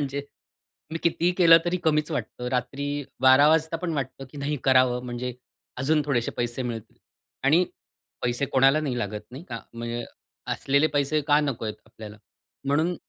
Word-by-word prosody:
म्हणजे 140 Hz, 0 st, -2 dB, 0.7 s
मी 165 Hz, -, -2 dB
कितीही 170 Hz, +1 st, +2 dB
केलं 165 Hz, -2 st, +8 dB
तरी 175 Hz, +1 st, 0 dB
कमीच 155 Hz, 0 st, +2 dB
वाटतं. 125 Hz, -2 st, -4 dB
रात्री 135 Hz, +3 st, -2 dB, 0.3 s
12 130 Hz, +3 st, +7 dB
वाजता 160 Hz, +1 st, +2 dB
पण 170 Hz, -1 st, -3 dB
वाटतं, 135 Hz, -1 st, -4 dB
की 145 Hz, -, -10 dB
नाही 145 Hz, +1 st, -1 dB
करावं 130 Hz, -2 st, +4 dB
म्हणजे 120 Hz, 0 st, -4 dB, 0.4 s
अजून 150 Hz, +3 st, +2 dB
थोडेसे 120 Hz, -5 st, 0 dB
पैसे 120 Hz, +2 st, -2 dB
मिळतील 115 Hz, -2 st, -6 dB, 0.5 s
आणि 160 Hz, +6 st, +5 dB, 0.6 s
पैसे 125 Hz, +3 st, 0 dB
कोणाला 135 Hz, +3 st, +5 dB
नाही 130 Hz, -5 st, -2 dB
लागत 105 Hz, -1 st, -3 dB
नाही 135 Hz, +7 st, -9 dB
का? 115 Hz, -1 st, -5 dB
म्हणजे 120 Hz, 0 st, -4 dB, 0.5 s
असलेले 140 Hz, +3 st, +2 dB
पैसे 145 Hz, +2 st, +2 dB
का 145 Hz, 0 st, +6 dB
नको 135 Hz, -6 st, -2 dB
आहेत 105 Hz, -, -4 dB
आपल्याला, 110 Hz, -1 st, -11 dB, 0.5 s
म्हणून 155 Hz, +6 st, +1 dB
135 Hz, 160 wpm, -25 LUFS, 120-150 Hz, 0.7 s, केलं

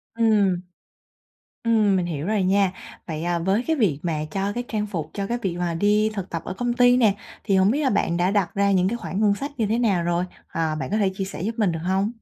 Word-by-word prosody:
Ừm. 205 Hz, -6 st, +3 dB, 1.0 s
Ừm, 215 Hz, -4 st, +3 dB
mình 180 Hz, -2 st, 0 dB
hiểu 155 Hz, -1 st, -4 dB
rồi 210 Hz, -2 st, +1 dB
nha. 195 Hz, 0 st, +2 dB, 0.3 s
Vậy, 160 Hz, -1 st, -4 dB
à, 175 Hz, 0 st, 0 dB
với 190 Hz, +7 st, +1 dB
cái 320 Hz, -1 st, +1 dB
việc 185 Hz, -, +1 dB
mà 155 Hz, -3 st, -2 dB
cho 195 Hz, +2 st, -1 dB
cái 245 Hz, +2 st, -3 dB
trang 210 Hz, -2 st, -2 dB
phục 160 Hz, -6 st, -5 dB
cho 200 Hz, -1 st, -2 dB
cái 240 Hz, +2 st, -2 dB
việc 180 Hz, -3 st, -2 dB
mà 175 Hz, -1 st, -1 dB
đi 210 Hz, +4 st, +2 dB
thực 195 Hz, -2 st, -5 dB
tập 165 Hz, -1 st, -3 dB
ở 185 Hz, -, -5 dB
công 245 Hz, +3 st, -1 dB
ty 245 Hz, 0 st, +5 dB
nè, 220 Hz, -5 st, +4 dB, 0.3 s
thì 195 Hz, -3 st, +2 dB
hổng 190 Hz, +2 st, +4 dB
biết 290 Hz, +5 st, 0 dB
là 265 Hz, -, +2 dB
bạn 170 Hz, -4 st, +1 dB
đã 180 Hz, +2 st, +2 dB
đặt 200 Hz, -4 st, +1 dB
ra 200 Hz, 0 st, +2 dB
những 185 Hz, -1 st, +3 dB
cái 235 Hz, -, -2 dB
khoản 200 Hz, -3 st, -4 dB
ngân 205 Hz, -2 st, +4 dB
sách 280 Hz, +7 st, -5 dB
như 220 Hz, -, +1 dB
thế 225 Hz, +3 st, 0 dB
nào 200 Hz, -8 st, +2 dB
rồi? 175 Hz, +1 st, 0 dB, 0.2 s
Ờ, 160 Hz, -1 st, -1 dB
bạn 130 Hz, -, -4 dB
có 215 Hz, -, +1 dB
thể 200 Hz, -3 st, +2 dB
chia 195 Hz, -, -3 dB
sẻ 190 Hz, -3 st, -7 dB
giúp 225 Hz, +3 st, -2 dB
mình 200 Hz, -5 st, +2 dB
được 165 Hz, -, -3 dB
hông? 190 Hz, +4 st, 0 dB
195 Hz, 265 wpm, -23 LUFS, 175-215 Hz, 1.0 s, ty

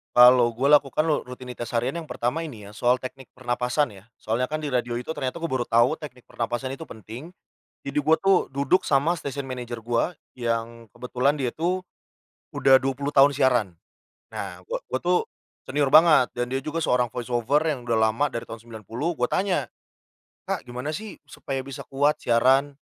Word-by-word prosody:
Kalau 125 Hz, -1 st, +7 dB
gua 140 Hz, +4 st, +6 dB
lakukan 140 Hz, +2 st, -1 dB
lo 155 Hz, -5 st, 0 dB
rutinitas 125 Hz, -1 st, -7 dB
harian 125 Hz, +8 st, 0 dB
yang 160 Hz, -, -9 dB
pertama 125 Hz, +5 st, -2 dB
ini 140 Hz, -11 st, -7 dB
ya, 100 Hz, -, -11 dB
soal 120 Hz, +3 st, +2 dB
teknik 130 Hz, 0 st, -8 dB
pernapasan 125 Hz, -2 st, -1 dB
ya. -, -, -21 dB
Soalnya 115 Hz, +4 st, -1 dB
kan 155 Hz, +2 st, -4 dB
di 145 Hz, -, -3 dB
radio 120 Hz, -1 st, 0 dB
itu 125 Hz, +6 st, -4 dB
ternyata 160 Hz, +2 st, -4 dB
gua 165 Hz, -, -2 dB
baru 120 Hz, -, -1 dB
tahu 120 Hz, +7 st, +3 dB
teknik 130 Hz, -5 st, -10 dB
pernapasan 120 Hz, +2 st, -3 dB
itu 140 Hz, +4 st, -7 dB
penting, 120 Hz, -, -10 dB, 0.5 s
jadi 140 Hz, -, -5 dB
gua 160 Hz, +3 st, +4 dB
tuh 195 Hz, -1 st, +2 dB
duduk 140 Hz, +7 st, +2 dB
sama 145 Hz, +5 st, +2 dB
station 140 Hz, -4 st, -5 dB
manager 125 Hz, -2 st, -5 dB
gua 120 Hz, +8 st, -1 dB, 0.2 s
yang 115 Hz, -2 st, -3 dB
kebetulan 125 Hz, +5 st, -1 dB
dia 125 Hz, -3 st, -2 dB
tuh 180 Hz, +3 st, -1 dB, 0.7 s
udah 135 Hz, -1 st, +6 dB
20 135 Hz, +2 st, -2 dB
tahun 140 Hz, 0 st, +5 dB
siaran. 120 Hz, -10 st, +2 dB, 0.5 s
Nah, 90 Hz, -2 st, -6 dB
gua -, -, -1 dB
gua 130 Hz, -, -2 dB
tuh 180 Hz, 0 st, +3 dB, 0.5 s
senior 140 Hz, 0 st, 0 dB
banget 155 Hz, -3 st, +6 dB
dan 120 Hz, -, 0 dB
dia 135 Hz, -, 0 dB
juga 155 Hz, +4 st, -4 dB
seorang 125 Hz, -1 st, +2 dB
voice 120 Hz, +2 st, -6 dB
over 140 Hz, +6 st, +2 dB
yang 150 Hz, -6 st, -1 dB
udah 120 Hz, -2 st, 0 dB
lama 110 Hz, +6 st, +2 dB
dari 115 Hz, -2 st, -5 dB
tahun 115 Hz, -, -8 dB
90 115 Hz, -, -5 dB
gue 125 Hz, -, +2 dB
tanya, 180 Hz, -2 st, 0 dB, 0.8 s
"Kak -, -, -2 dB
gimana 125 Hz, +5 st, -5 dB
sih 210 Hz, +5 st, -7 dB
supaya 135 Hz, -1 st, -5 dB
bisa 135 Hz, -2 st, -7 dB
kuat 145 Hz, +2 st, +1 dB
siaran, 135 Hz, +4 st, +3 dB
130 Hz, 185 wpm, -25 LUFS, 120-150 Hz, 0.8 s, Kalau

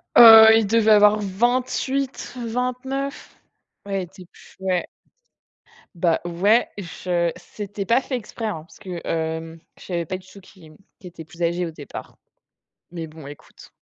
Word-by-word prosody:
Heu, 225 Hz, -1 st, +10 dB
il 225 Hz, -2 st, +2 dB
devait 220 Hz, 0 st, +3 dB
avoir 210 Hz, 0 st, +6 dB
28-29. 250 Hz, +3 st, -2 dB, 0.5 s
Ouais, 195 Hz, -1 st, -2 dB
il -, -, -6 dB
était 180 Hz, +1 st, -15 dB
plus, -, -, -20 dB
ouais 185 Hz, -2 st, -1 dB, 1.1 s
ben, 170 Hz, -1 st, +2 dB
ouais, 195 Hz, +7 st, +2 dB
je 175 Hz, -1 st, -2 dB
c'était 200 Hz, +2 st, -7 dB
pas 235 Hz, +6 st, +3 dB
fait 265 Hz, -, -4 dB
exprès, 235 Hz, -1 st, -6 dB
hein, 205 Hz, -8 st, -3 dB
parce 165 Hz, -, -19 dB
que, 185 Hz, -4 st, -7 dB
hem, 160 Hz, 0 st, -3 dB, 0.2 s
je -, -, -14 dB
savais 170 Hz, -2 st, -3 dB
pas 185 Hz, +4 st, -4 dB
du 185 Hz, 0 st, -18 dB
tout 200 Hz, +1 st, -14 dB
qui 185 Hz, -2 st, -18 dB
m 155 Hz, 0 st, -17 dB, 0.2 s
qu'il 185 Hz, -, -11 dB
était 170 Hz, -2 st, -11 dB
plus 170 Hz, +2 st, -14 dB
âgé 170 Hz, +1 st, 0 dB
au -, -, -7 dB
départ 150 Hz, -3 st, -10 dB, 0.8 s
mais 165 Hz, -2 st, -6 dB
bon, 155 Hz, -2 st, -12 dB
écoute. 145 Hz, 0 st, -14 dB
190 Hz, 160 wpm, -22 LUFS, 170-225 Hz, 1.1 s, Heu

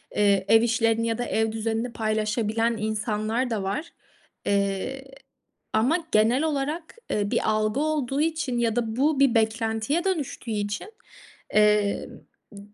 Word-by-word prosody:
eee, 200 Hz, -2 st, +3 dB
ev 225 Hz, 0 st, +6 dB
işlerini 230 Hz, -1 st, +1 dB
ya 225 Hz, -1 st, -1 dB
da 245 Hz, -, -2 dB
ev 220 Hz, -1 st, 0 dB
düzenini 225 Hz, +2 st, -2 dB
paylaşabilen 220 Hz, +1 st, 0 dB
insanlar 215 Hz, +3 st, -1 dB
da 220 Hz, -4 st, -2 dB
var. 205 Hz, -, -3 dB, 0.5 s
Eee, 200 Hz, +6 st, -1 dB, 0.7 s
ama 245 Hz, +10 st, +3 dB
genel 225 Hz, +7 st, +3 dB
olarak, 310 Hz, -, -2 dB
eee, 205 Hz, -1 st, -1 dB
bir -, -, +1 dB
algı 215 Hz, +3 st, 0 dB
olduğu 295 Hz, -3 st, 0 dB
için 310 Hz, -6 st, -1 dB
ya 230 Hz, -2 st, +1 dB
da 225 Hz, -2 st, -1 dB
bu 285 Hz, +3 st, +2 dB
bir 275 Hz, -4 st, +4 dB
beklentiye 225 Hz, +6 st, +1 dB
dönüştüğü 315 Hz, -10 st, -2 dB
için, 205 Hz, -, -3 dB, 0.6 s
eee, 210 Hz, -1 st, +3 dB, 0.4 s
ı -, -, -13 dB
ı -, -, -9 dB
225 Hz, 140 wpm, -25 LUFS, 215-265 Hz, 0.7 s, ev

